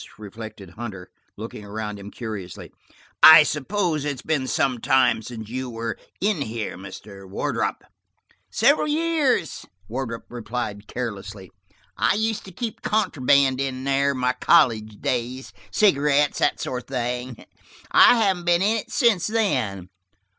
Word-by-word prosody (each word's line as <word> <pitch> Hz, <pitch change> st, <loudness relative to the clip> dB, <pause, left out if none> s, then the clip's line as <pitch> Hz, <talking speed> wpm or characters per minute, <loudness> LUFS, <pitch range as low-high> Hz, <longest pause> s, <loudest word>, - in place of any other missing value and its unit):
reflected 105 Hz, -3 st, -10 dB
Hunter, 105 Hz, -6 st, -8 dB, 0.3 s
looking 110 Hz, 0 st, -8 dB
around 105 Hz, 0 st, -5 dB
him 100 Hz, +1 st, -9 dB
curiously. 105 Hz, -6 st, -7 dB, 0.5 s
"I 160 Hz, -1 st, +11 dB
suppose 155 Hz, +1 st, -1 dB
it 145 Hz, -, -1 dB
has 135 Hz, -3 st, -5 dB
been 145 Hz, -5 st, -1 dB
some 130 Hz, -1 st, 0 dB
time 125 Hz, -2 st, +3 dB
since 110 Hz, -1 st, -8 dB
you 130 Hz, +3 st, -4 dB
were 115 Hz, -1 st, -4 dB, 0.2 s
in 200 Hz, -5 st, 0 dB
here, 110 Hz, -4 st, -4 dB
Mr. 95 Hz, +1 st, -11 dB
Wardrop?" 95 Hz, -, -2 dB, 0.7 s
"Several 285 Hz, +6 st, +3 dB
years," 310 Hz, -3 st, 0 dB, 0.2 s
Wardrop 115 Hz, -1 st, -5 dB
replied 110 Hz, -3 st, -5 dB
carelessly. 105 Hz, -5 st, -6 dB, 0.5 s
"I -, -, +2 dB
used 220 Hz, 0 st, -1 dB
to 190 Hz, -, -10 dB
keep 225 Hz, +5 st, -5 dB
contraband 140 Hz, -10 st, +2 dB
here 135 Hz, 0 st, 0 dB
in 135 Hz, +1 st, 0 dB
my 125 Hz, 0 st, +1 dB
college 110 Hz, -12 st, +2 dB
days, 125 Hz, +2 st, -3 dB, 0.2 s
cigarettes 145 Hz, -7 st, +2 dB
and -, -, +3 dB
that -, -, -25 dB
sort 125 Hz, -1 st, -4 dB
of -, -, -43 dB
thing. 125 Hz, -1 st, -4 dB, 0.5 s
I -, -, +7 dB
haven't 185 Hz, -4 st, 0 dB
been 175 Hz, +1 st, +3 dB
in 215 Hz, +3 st, +2 dB
it 215 Hz, -, -6 dB
since 230 Hz, -, +2 dB
then." 110 Hz, -, -1 dB
130 Hz, 140 wpm, -23 LUFS, 110-160 Hz, 0.7 s, I